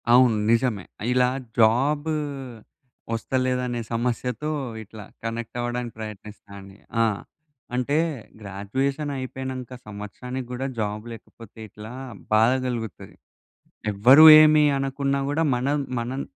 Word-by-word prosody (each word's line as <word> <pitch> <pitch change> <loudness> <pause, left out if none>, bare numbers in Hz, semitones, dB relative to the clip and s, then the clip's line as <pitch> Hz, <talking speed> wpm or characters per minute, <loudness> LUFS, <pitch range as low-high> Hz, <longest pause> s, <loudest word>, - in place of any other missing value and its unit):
అవును 125 -2 +6 0.2
నిజమే. 115 -4 +1 0.3
ఇలా 125 0 +4 0.3
జాబు 140 +8 +3 1.0
ఒస్తలేదనే 125 0 -1
సమస్యతో 125 +4 -2 0.3
ఇట్లా 105 0 -11 0.2
కనెక్ట్ 115 0 -5
అవ్వడానికి 120 -1 -3
ప్రయత్నిస్తా 105 -1 -9
అండి. 95 0 -13 0.3
ఆ! - - +4 0.7
అంటే 125 +4 0 0.4
గ్రాడ్యుయేషనైపోయినంక 130 +5 -4 0.2
సంవత్సరానికి 120 +5 -7
కూడా 125 +2 -3
జాబ్ 105 0 -2
లేకపోతే 115 -1 -13
ఇట్లా 105 +2 -10 0.4
బాధ 110 +3 +5
గలుగుతది. 115 -4 -5 0.8
ఎవ్వరు 125 +10 +7 0.2
ఏమి 155 0 +6
అనకున్నా 135 0 -1
గూడా 155 +3 +1
మనం 135 +4 0 0.2
మనం 125 +4 -3
125 Hz, 100 wpm, -24 LUFS, 110-130 Hz, 1.0 s, ఎవ్వరు